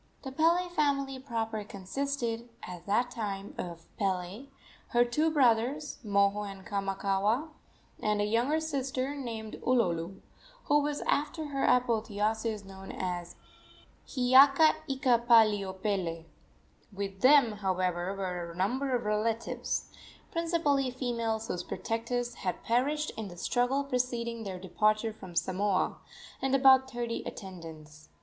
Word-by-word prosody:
The 265 - -5
Pele 335 +5 +3
family 280 -5 0
proper 225 -4 -3
consisted, 235 +4 -3
at 180 0 -8
that 240 +5 +1
time, 205 -4 -4
of 170 -2 -6
Pele, 190 +5 -2 0.4
her 240 0 +3
two 300 +7 +1
brothers, 270 +1 +2
Moho 200 -1 +2
and 190 -1 -12
Kamakaua, 200 +7 0 0.5
and 210 -1 +1
a 205 - +2
younger 240 +9 +1
sister 275 -3 -2
named 230 -6 -6
Ulolu, 190 -7 +1 0.4
who 295 0 +3
was 295 0 -2
after 300 +1 -1
her 275 -1 0
apotheosis 220 -2 +1
known 195 0 -9
as 175 -2 -4 0.7
Hiiaka 275 +4 +6
ika 265 -3 +2
pali 225 -3 +5
opele. 190 -4 -3 0.7
With 195 -1 -5
them, 265 -3 +6
however, 185 -1 -1
were 180 -3 -3
a 170 - -10
number 250 +9 0
of 240 - -2
relatives 215 +2 -1 0.4
principally 325 -5 +1
females, 230 -3 -2
whose 175 - -2
protectors 235 +5 -3
had 180 -2 -3
perished 290 +6 +1
in 220 -2 -4
the 175 -2 -10
struggle 245 +8 +1
preceding 240 -3 -2
their 190 -2 -4
departure 215 +4 +1
from 190 -5 -11
Samoa 185 +2 +1 0.4
and 270 0 +2
about 265 -1 +6
thirty 240 -2 -3
attendants. 160 -5 -10
225 Hz, 125 wpm, -30 LUFS, 195-265 Hz, 0.7 s, Hiiaka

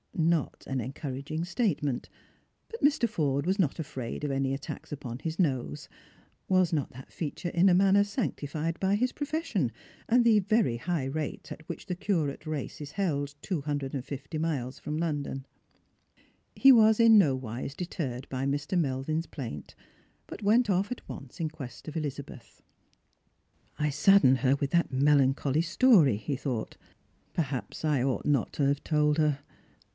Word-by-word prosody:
Not 165 -3 0
an 135 -1 -1
encouraging 140 +5 -4
statement; 170 - -1 0.6
but 460 - -8
Mr. 290 -4 +3
Forde 140 -8 0
was 190 +3 0
not 155 -8 +1
afraid 130 -4 -5
of 145 - -1
any 135 0 0
attacks 140 +1 -7
upon 130 -4 -6
his 160 +1 -4
nose: 130 - -1 0.6
was 185 -2 +3
not 145 -4 -1
that 130 +1 -12
feature 170 +2 -4
in 175 +3 +4
a - - +5
manner 195 +2 +5
sanctified 165 - -3
by 195 +1 +2
his 250 +4 +1
profession, 290 - -2 0.4
and 240 +1 +4
the 225 -3 +5
very 205 - +1
high 160 +2 -2
rate 150 +2 -4
at 155 - -9
which - - -6
the 180 - -3
curate 165 -6 -1
race 155 -1 -4
is 145 0 -7
held 145 -7 -1
two 180 -6 -2
hundred 145 -2 -3
and 135 -2 -4
fifty 140 +2 -6
miles 145 -6 -2
from 150 +1 -4
London 145 -4 -2 0.7
P - - -30 0.4
He 270 - +9
was 220 -3 +6
in 230 -1 +7
nowise 130 - 0
deterred 140 -8 -4
by 130 0 -2
Mr. 145 +6 -1
Melvin's 155 +2 -1
plaint, 115 - -7 0.5
but - - -9
went 230 +5 +4
otf 195 +2 +1
at 250 - -6
once 135 -3 -9
in 160 -2 -1
quest 145 -4 -10
of 155 +1 -5
Elizabeth. 140 -5 -6 0.6
" - - -38
I 150 0 +1
saddened 150 -3 +5
her 135 0 +3
with 140 0 -2
that 170 -4 +2
melancholy 140 +1 +3
story," 170 - +5
he 110 +7 -3
thought. 125 -4 -4 0.3
" - - -39
Perhaps 140 -1 -3
I 150 -4 +2
ought 135 -2 -1
not 140 -5 +1
to 145 - +1
have 140 +1 0
told 150 -1 +2
her. 150 -3 +2
150 Hz, 170 wpm, -29 LUFS, 135-180 Hz, 0.7 s, He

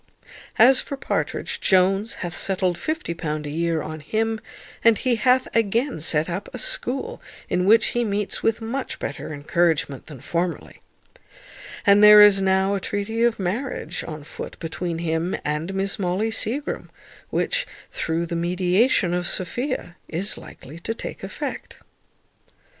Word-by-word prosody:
As 255 +4 +7
for 280 - -6
Partridge, - - -2
Jones 195 +3 +3
hath 175 0 -4
settled 185 -2 +1
£50 170 - -3
a - - -4
year 165 0 0
on 155 0 -6
him; 220 +7 -1 0.4
and 230 -2 +6
he 245 -2 +1
hath 255 +3 +3
again 230 - +1
set 155 0 +1
up 185 +3 -4
a - - -6
school, - - -2 0.3
in 180 +1 +1
which 225 +2 +6
he 240 - +1
meets 205 -2 -2
with 225 0 +1
much 245 +4 -4
better - - -5
encouragement 150 -2 0
than 150 -4 -10
formerly, 170 +6 -3 1.0
and 200 0 +6
there 210 0 +10
is 205 -2 +8
now 190 +1 +2
a 200 - 0
treaty 205 +4 -3
of 235 -1 +3
marriage 190 - -3
on 155 -2 -7
foot - - -8
between 170 +1 -4
him 165 +1 -1
and 150 +4 -2
Miss 195 +1 -1
Molly 195 +4 0
Seagrim, 240 +6 -1 0.4
which, - - 0 0.2
through 165 +1 -1
the 170 - -4
mediation 180 +3 +2
of 175 0 -1
Sophia, 240 - -3
is 185 +6 -2
likely 155 +6 -11
to 225 +6 -3
take - - -7
effect. - - -5
190 Hz, 145 wpm, -23 LUFS, 170-225 Hz, 1.0 s, there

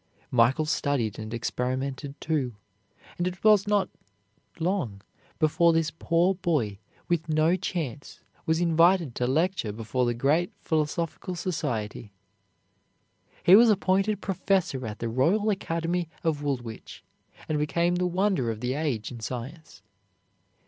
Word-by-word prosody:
Michael 125 +5 +3
studied 140 -8 -1
and 110 0 -6
experimented, 130 +4 -3
too, 140 -7 -1 0.6
and 175 - +1
it 180 -1 -6
was 210 -2 +5
not 205 -2 +2 0.7
long 160 - -2 0.3
before 170 +2 +3
this 160 -1 +1
poor 170 +3 +2
boy 150 - -1 0.3
with 170 -1 -1
no 155 +3 +3
chance 160 -7 -4 0.3
was 160 +1 +2
invited 170 -3 +3
to 125 - -1
lecture 160 - 0
before 115 +3 -1
the 120 - 0
great 150 +8 +1
philosophical 165 +3 -2
society. 115 - -3 1.3
He 180 - +8
was 230 +2 +7
appointed 195 0 +2
professor 180 - 0
at 105 0 -6
the 115 - -3
Royal 170 - +2
Academy 170 -2 -2
of 160 -3 0
Woolwich, 125 -6 -5 0.4
and 155 -1 0
became 170 +4 +1
the 180 0 +1
wonder 180 - +1
of 110 -1 -3
the 125 +2 -1
age 135 -8 -2
in 120 - -8
science. 125 - -7
155 Hz, 130 wpm, -27 LUFS, 125-175 Hz, 1.3 s, He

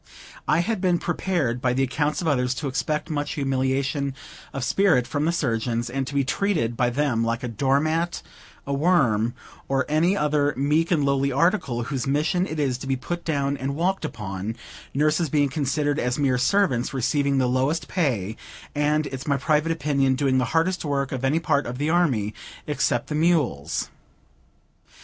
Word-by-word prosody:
I 155 +3 +3
had 215 +1 -2
been 180 -2 +3
prepared 165 -8 -1
by 125 -1 +1
the 135 +2 +1
accounts 150 +6 -1
of - - -2
others, 125 -4 +1
to 145 +2 -3
expect 150 +4 -2
much 145 +1 -2
humiliation 135 -1 -1 0.4
of 135 - -4
spirit 160 -3 +3
from 145 +4 -1
the 165 - +2
surgeons, 120 -5 -1
and 135 0 -2
to 140 - -6
be 140 - +3
treated 135 - 0
by 120 0 +2
them 125 -3 0
like 115 +1 -1
a - - -1
door 135 +4 +1
mat, 165 +3 -1 0.4
a 140 - -2
worm, 135 - +2 0.3
or 135 -1 +1
any 170 +6 +2
other 150 -2 +1
meek 150 +5 +2
and 155 -5 +2
lowly 140 0 +1
article, 140 - +1
whose 135 +1 -3
mission 160 +7 +1
it 155 - -4
is 130 -4 0
to 135 - -7
be 135 - +1
put 170 +8 -5
down 140 -3 0
and 135 +2 -3
walked 185 +4 0
upon; 105 -6 -4 0.4
nurses 155 +3 +2
being 145 -1 +2
considered 145 +1 0
as 125 0 0
mere 135 -4 +2
servants, 135 -5 +1
receiving 140 +2 +1
the 130 - +3
lowest 135 +5 0
pay, 115 - -1 0.4
and, 150 +1 +1
it's 135 0 -6
my 140 -1 +2
private 150 +3 +1
opinion, 140 -4 +1
doing 130 -1 +2
the 125 - +1
hardest 165 +7 0
work 140 -3 -1
of 130 -1 -4
any 135 +4 +2
part 145 -3 +1
of 125 +1 -5
the 150 +3 0
army, 130 -12 +1 0.3
except - - 0
the - - -5
mules. 150 - +1
140 Hz, 180 wpm, -24 LUFS, 130-155 Hz, 0.4 s, I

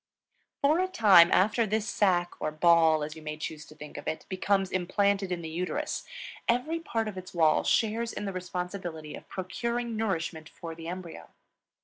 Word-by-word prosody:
For 305 +4 +4
a 370 - +2
time 200 - +7
after 215 +4 +3
this 215 +1 -1
sac, 180 -4 +2
or - - 0
ball, 160 0 +4
as 155 +1 -5
you 160 - -10
may 155 0 -5
choose 155 0 -6
to 155 - -14
think 150 -1 -10
of - - -8
it, 160 - -3
becomes 195 0 +1
implanted 195 +1 +1
in 175 -1 -3
the - - -4
uterus, 180 - -3 0.4
every 250 +8 +1
part 225 -9 -2
of 195 -3 -5
its 185 0 -12
wall 160 -2 +4
shares 230 +1 +1
in 205 - -5
the 195 - -3
responsibility 180 -3 -5
of - - -11
procuring 235 +5 -3
nourishment 170 -7 -2
for 165 -1 -8
the 165 0 -9
embryo. 180 -1 -7
185 Hz, 180 wpm, -29 LUFS, 165-215 Hz, 0.4 s, time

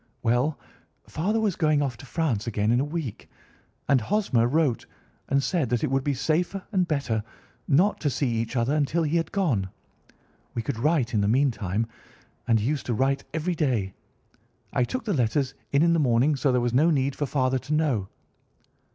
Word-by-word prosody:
"Well, 125 +6 +1 0.5
father 205 +8 -1
was 210 -5 0
going 155 -3 +2
off 130 -4 -2
to 135 - -12
France 125 -8 -1
again 105 -1 0
in 120 - +3
a - - +2
week, 150 -6 -5 0.6
and 135 -3 +4
Hosmer 130 - +1
wrote 145 -2 +1 0.4
and 140 0 +2
said 160 -8 0
that 120 -1 0
it 150 - 0
would 135 0 +1
be 145 -1 0
safer 175 +7 -1
and 185 -4 +1
better 135 -9 -1 0.4
not 175 +9 +3
to 150 - +1
see 140 +1 -1
each 115 +1 -2
other 120 +3 +1
until 155 +3 +1
he 155 +2 +1
had 165 - -2
gone. 130 - 0 0.9
We 115 - -2
could 110 - -3
write 140 -3 +1
in 105 - +2
the 100 - +1
meantime, 110 -4 +1 0.6
and 115 -2 +4
he 105 - -2
used 150 0 -2
to 120 - 0
write 135 +3 0
every 165 +3 -1
day. 125 - 0 0.8
I 125 - +2
took 255 - -4
the 210 - 0
letters 130 0 0 0.2
in 140 +2 +4
in 170 0 +4
the 165 - +2
morning, 130 +2 +3
so 140 0 +1
there 125 -1 +2
was 120 -1 -1
no 150 +7 +4
need 140 -3 +1
for 145 - -2
father 130 -1 +1
to 140 +4 -4
know." 135 -11 0
140 Hz, 195 wpm, -26 LUFS, 120-155 Hz, 0.9 s, and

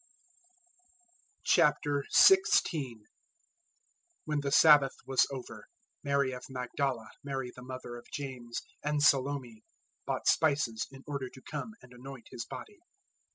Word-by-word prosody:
016:001 150 - +3 1.2
When 150 -1 -1
the 140 -1 -2
Sabbath 145 -2 +6
was 135 -1 +3
over, 130 -2 -8 0.4
Mary 140 -2 +1
of 125 -1 -7
Magdala, 125 -2 -3
Mary 135 -3 -4
the 125 - -11
mother 130 -1 -7
of 120 - -13
James, 125 -4 -6 0.2
and 150 0 0
Salome, 135 -5 +1 0.4
bought - - -2
spices, 140 -8 +2
in 135 0 -14
order 140 -3 -4
to 130 - -15
come 155 +8 -6
and 125 - -15
anoint 130 0 -11
His 115 - -6
body. 415 -2 -10
135 Hz, 115 wpm, -31 LUFS, 125-145 Hz, 1.2 s, Sabbath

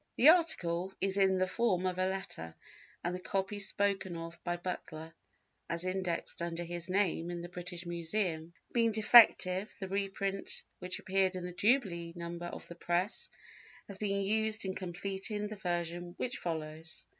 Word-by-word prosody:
The 275 - +8
article 190 - +3
is 195 0 +2
in 190 -1 +4
the 185 - +3
form 185 -2 +1
of 185 0 -1
a 185 - +2
letter, 85 - -4 0.5
and 175 - -1
the 180 - -3
copy 195 +2 -2
spoken 200 -3 +2
of 165 0 -8
by 175 0 -1
Butler, 165 -2 -6 0.6
as 170 +1 0
indexed 185 -3 -2
under 170 0 -2
his 175 +1 -5
name 180 -3 +1
in 175 -1 -4
the 175 - -7
British 175 0 -5
Museum, 170 -1 -2 0.2
being 230 -1 +3
defective, 210 -3 +6
the 190 - -4
reprint 195 0 -1 0.2
which 180 0 -3
appeared 190 0 +1
in 180 -1 -4
the 180 - -5
jubilee 180 -6 +1
number 170 0 -5
of - - -8
the - - -8
Press 175 +4 -1 0.6
has 200 -1 -6
been 200 -1 +1
used 220 +1 +1
in 190 - -1
completing 195 +3 -2
the 215 +1 -5
version 175 -2 -3
which 250 - -2
follows. 160 -1 -4
185 Hz, 165 wpm, -33 LUFS, 170-200 Hz, 0.6 s, The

